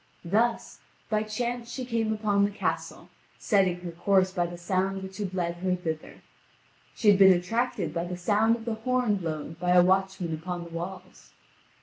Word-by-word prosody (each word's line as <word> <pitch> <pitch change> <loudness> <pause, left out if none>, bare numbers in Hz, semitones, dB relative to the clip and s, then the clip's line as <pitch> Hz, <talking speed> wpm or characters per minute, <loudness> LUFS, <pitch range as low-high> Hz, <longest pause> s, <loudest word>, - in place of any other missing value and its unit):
Thus, 225 +6 0 0.3
by 215 0 +2
chance 235 +2 -3
she 255 0 -4
came 230 -2 -1
upon 210 -2 +1
the 200 - +2
castle, 205 - -4 0.3
setting 185 -4 +1
her 175 -1 -6
course 185 +2 +2
by 175 -2 0
the 175 0 -8
sound 190 +2 -1
which 190 0 -8
had 190 -3 -3
led 170 -1 -1
her 185 +1 0
thither. 160 -3 -6 0.7
She 215 - +3
had 200 - +3
been 190 -1 +9
attracted 185 -1 -1
by 170 0 -2
the 180 0 -5
sound 215 +5 +2
of 225 -1 -9
the 230 - -1
horn 235 -1 0
blown 160 -2 -5
by 180 0 +2
a 180 -1 +7
watchman 190 -2 +1
upon 175 +2 -4
the 170 - -11
walls. 180 +2 -8
190 Hz, 185 wpm, -27 LUFS, 175-215 Hz, 0.7 s, been